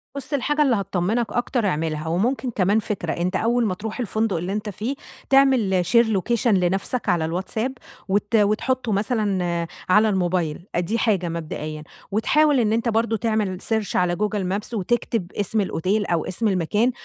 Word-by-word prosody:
بُص 280 Hz, +1 st, -6 dB
الحاجة 295 Hz, +2 st, +1 dB
اللي 265 Hz, -5 st, +4 dB
هتطمّنك 200 Hz, +3 st, 0 dB
أكتر 240 Hz, -1 st, 0 dB
أعملها، 155 Hz, -3 st, -1 dB
وممكن 240 Hz, +10 st, 0 dB
كمان 205 Hz, 0 st, +2 dB
فكرة 200 Hz, -6 st, -3 dB
أنت 175 Hz, +2 st, -2 dB
أول 235 Hz, +1 st, +2 dB
ما 190 Hz, -, 0 dB
تروح 215 Hz, +6 st, -6 dB
الفندق 220 Hz, -4 st, 0 dB
اللي 180 Hz, +4 st, -3 dB
أنت 210 Hz, 0 st, -3 dB
فيه، 220 Hz, +8 st, -3 dB, 0.3 s
تعمل 255 Hz, -10 st, +4 dB
Share 235 Hz, +6 st, +5 dB
location 235 Hz, +5 st, 0 dB
لنفْسك 195 Hz, +3 st, +1 dB
على 170 Hz, -3 st, +2 dB
الwhatsapp، 205 Hz, +8 st, -2 dB, 0.4 s
وت 205 Hz, +3 st, 0 dB
وتحطه 225 Hz, +4 st, +1 dB
مثلًا 195 Hz, -5 st, 0 dB, 0.2 s
على 215 Hz, +3 st, +5 dB
الموبايل، 175 Hz, -3 st, -1 dB
أ -, -, +2 dB
دي 195 Hz, +7 st, -1 dB
حاجة 190 Hz, -6 st, +1 dB
مبدئيًا، 155 Hz, -2 st, -5 dB, 0.3 s
وتحاول 290 Hz, +6 st, +3 dB
إن 220 Hz, -1 st, +2 dB
أنت 230 Hz, +1 st, +1 dB
برضه 225 Hz, 0 st, +1 dB
تعمل 215 Hz, -4 st, -1 dB
search 220 Hz, -3 st, -1 dB
على 180 Hz, -1 st, +2 dB
google 210 Hz, +1 st, -1 dB, 0.2 s
Maps 215 Hz, +3 st, -8 dB
وتكتب 215 Hz, -2 st, -1 dB
اسم 205 Hz, +1 st, -1 dB
الأوتيل 195 Hz, +3 st, 0 dB
أو 170 Hz, -3 st, 0 dB
اسم 220 Hz, +4 st, -1 dB
المكان، 205 Hz, +6 st, +1 dB
210 Hz, 165 wpm, -23 LUFS, 180-230 Hz, 0.4 s, Share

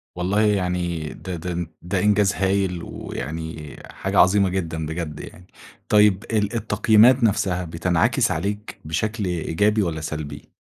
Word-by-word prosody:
والله 95 Hz, +4 st, 0 dB
يعني 90 Hz, -6 st, 0 dB
ده 90 Hz, -2 st, -6 dB
ده 85 Hz, 0 st, -4 dB
ده 95 Hz, +2 st, -1 dB
إنجاز 105 Hz, 0 st, +3 dB
هايل، 95 Hz, -2 st, 0 dB
ويعني 80 Hz, 0 st, -6 dB, 0.2 s
حاجة 95 Hz, 0 st, -1 dB
عظيمة 95 Hz, +1 st, +5 dB
جدًا 80 Hz, -4 st, -3 dB
بجد 80 Hz, -1 st, -5 dB
يعني. 90 Hz, +1 st, -11 dB, 0.4 s
طيّب 105 Hz, -1 st, +4 dB
ال 105 Hz, 0 st, 0 dB
التقييمات 115 Hz, +3 st, +4 dB
نفْسها 95 Hz, -4 st, +1 dB
بتنعكس 85 Hz, +1 st, +1 dB
عليك 100 Hz, +6 st, -4 dB
بشكل 105 Hz, +7 st, -2 dB
إيجابي 90 Hz, +5 st, +1 dB
والّا 80 Hz, -5 st, -2 dB
سلبي؟ 75 Hz, -2 st, -6 dB
90 Hz, 130 wpm, -23 LUFS, 80-105 Hz, 0.4 s, عظيمة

